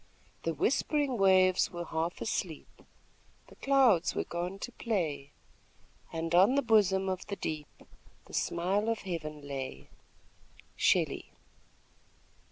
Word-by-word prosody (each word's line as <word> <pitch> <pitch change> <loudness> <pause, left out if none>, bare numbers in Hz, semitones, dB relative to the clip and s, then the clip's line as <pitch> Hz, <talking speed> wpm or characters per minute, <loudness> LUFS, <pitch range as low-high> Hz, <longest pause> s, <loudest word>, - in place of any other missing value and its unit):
The 165 -1 -2
whispering 275 - +1
waves 185 -1 +4
were 175 -1 -6
half 165 +2 -3
asleep 175 -7 -4 0.7
The - - -15
clouds 260 -10 +3
were - - 0
gone 175 +3 -4
to 245 - -6
play, 160 - -2 0.8
And 165 0 -3
on 190 +9 +6
the 280 - +2
bosom 195 -5 +3
of 185 -1 -3
the 200 - -3
deep 155 -5 -4 0.6
The - - -16
smile 195 +6 0
of 230 - -1
heaven 155 -5 -5
lay. 130 - -6 0.9
Shelley. - - +1
185 Hz, 120 wpm, -31 LUFS, 165-215 Hz, 0.9 s, on